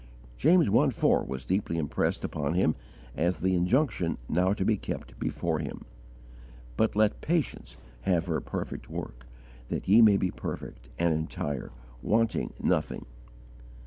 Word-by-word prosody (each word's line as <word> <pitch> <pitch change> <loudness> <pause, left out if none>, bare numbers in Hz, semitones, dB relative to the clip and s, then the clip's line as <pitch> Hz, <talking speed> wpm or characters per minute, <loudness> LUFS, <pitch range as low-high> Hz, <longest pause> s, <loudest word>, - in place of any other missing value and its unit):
James 170 - +4
i. 100 - +4
4 - - +2
was 65 0 -5
deeply 95 -3 0
impressed 75 -3 -1
upon 75 +2 -2
him 90 -4 +3 0.4
as 90 +3 +1
the 95 0 +1
injunction 90 - +1
now 90 +4 +2
to 100 -2 0
be 110 - +3
kept - - -6
before 80 -2 -1
him: 75 -3 -6 0.9
"But 110 -1 +1
let 105 0 +2
patience 150 - -2 0.2
have 85 +4 +1
her 80 -3 -1
perfect - - -5
work, - - -7 0.4
that - - -3
ye 105 +5 +7
may 105 -3 +7
be 95 -2 0
perfect, - - -7
and 85 +1 +2
entire, 75 -3 -3 0.3
wanting 110 - +1
nothing." - - 0
90 Hz, 145 wpm, -28 LUFS, 80-105 Hz, 0.9 s, ye